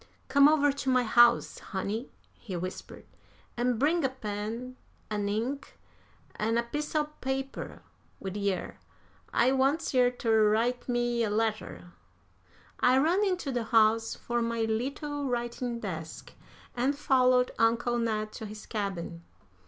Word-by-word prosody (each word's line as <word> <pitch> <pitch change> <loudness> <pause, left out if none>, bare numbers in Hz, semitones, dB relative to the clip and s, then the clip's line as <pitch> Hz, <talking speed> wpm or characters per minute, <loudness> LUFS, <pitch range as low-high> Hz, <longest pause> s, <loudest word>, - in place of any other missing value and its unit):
"Come 280 0 +7
over 295 -1 +4
to 275 -1 -3
my 255 -1 +4
house, 240 +1 +4
honey," 205 +5 -4 0.2
he 195 -6 -8
whispered, 185 +2 -6 0.5
"an' 245 0 0
bring 310 +6 +2
a 265 - +2
pen 230 +1 -5 0.4
an' 205 -1 -1
ink 240 +7 -3 0.6
an' 225 +2 0
a 235 - +2
piece 295 +6 -5
o' 305 - +3
paper 270 -2 -5 0.4
wid 190 0 -5
yer. 200 -3 -2 0.5
I 245 +2 +3
wants 275 +4 +1
yer 250 -1 +5
ter 225 -3 +2
write 240 +4 0
me 240 -1 +1
a 215 - 0
letter." 215 -4 -2 0.9
I 255 +1 +4
ran 335 +9 +3
into 360 -8 -1
the 240 -3 -2
house 225 0 +3
for 240 0 -2
my 230 0 -1
little 275 +6 -2
writing 240 0 -2
desk, 160 -6 -6 0.4
and 265 +4 0
followed 255 -3 +3
Uncle 235 +1 +2
Ned 215 -2 -1
to 220 - -7
his 210 0 -9
cabin. 190 -6 -4
240 Hz, 140 wpm, -29 LUFS, 215-265 Hz, 0.9 s, Come